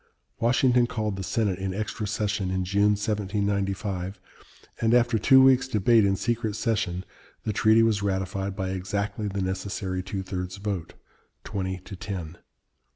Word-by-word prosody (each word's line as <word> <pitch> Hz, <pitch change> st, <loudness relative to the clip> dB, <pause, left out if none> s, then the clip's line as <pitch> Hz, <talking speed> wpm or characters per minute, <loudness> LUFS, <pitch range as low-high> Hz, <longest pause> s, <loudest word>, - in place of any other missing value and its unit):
Washington 120 Hz, +1 st, +3 dB
called 110 Hz, -4 st, -2 dB
the 95 Hz, -, -5 dB
Senate 100 Hz, -1 st, 0 dB
in 95 Hz, -1 st, -3 dB
extra 105 Hz, +1 st, -3 dB
session 105 Hz, -2 st, -1 dB
in 95 Hz, 0 st, -1 dB
June, 100 Hz, +3 st, +3 dB
1795, 100 Hz, -2 st, -2 dB, 0.6 s
and 115 Hz, +1 st, +4 dB
after 120 Hz, -2 st, +3 dB
two 130 Hz, +6 st, +7 dB
weeks' 130 Hz, 0 st, +5 dB
debate 110 Hz, -1 st, +4 dB
in 95 Hz, 0 st, +2 dB
secret 115 Hz, 0 st, -1 dB
session 105 Hz, -6 st, -1 dB, 0.4 s
the 110 Hz, -, -1 dB
treaty 110 Hz, +2 st, +5 dB
was 110 Hz, -3 st, +2 dB
ratified 95 Hz, 0 st, -2 dB
by 95 Hz, -2 st, -2 dB
exactly 100 Hz, +3 st, -2 dB
the 100 Hz, -1 st, -2 dB
necessary 95 Hz, 0 st, -3 dB
two 95 Hz, +1 st, -4 dB
thirds 90 Hz, 0 st, -5 dB
vote, 100 Hz, -4 st, -4 dB, 0.5 s
twenty 95 Hz, -1 st, -3 dB
to 100 Hz, -, -8 dB
ten. 90 Hz, -3 st, -6 dB
100 Hz, 150 wpm, -26 LUFS, 95-110 Hz, 0.6 s, two